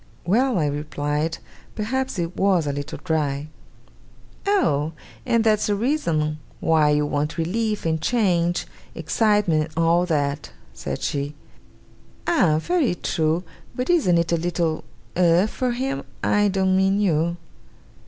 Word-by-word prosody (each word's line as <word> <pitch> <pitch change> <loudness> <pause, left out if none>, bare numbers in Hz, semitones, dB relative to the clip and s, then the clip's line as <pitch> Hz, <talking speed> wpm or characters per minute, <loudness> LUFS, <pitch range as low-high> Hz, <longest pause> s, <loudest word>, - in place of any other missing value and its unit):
'Well,' 235 +6 +2
I 155 - +2
replied; 145 +2 -2 0.4
'perhaps 260 +3 -2
it 170 0 -3
was 190 -5 +2
a 145 - -1
little 145 +1 -5
dry.' 150 -3 -1 1.0
'Oh! 160 - +2 0.3
and 230 -2 +3
that's 215 -2 +2
a 205 - +2
reason 170 - 0 0.2
why 155 -2 +3
you 150 0 +2
want 145 +2 -2
relief 210 +6 -1
and 160 -1 0
change 175 -7 +1 0.3
excitement 185 -8 +1
and 165 - +3
all 170 +2 +3
that?' 145 -2 -1 0.2
said 65 - -5
she. 145 +1 -2 0.9
'Ah! 190 - +3
very 295 - +1
true! 160 0 0 0.3
But 250 +7 0
isn't 265 - +3
it 170 0 0
a 170 - +3
little 170 -1 -1 0.3
Eh? 175 +1 +4
for 250 +3 -2
him; 265 +3 -2 0.2
I 205 0 +3
don't 190 -1 +1
mean 190 +1 +3
you? 170 -3 +1
170 Hz, 135 wpm, -23 LUFS, 155-210 Hz, 1.0 s, Eh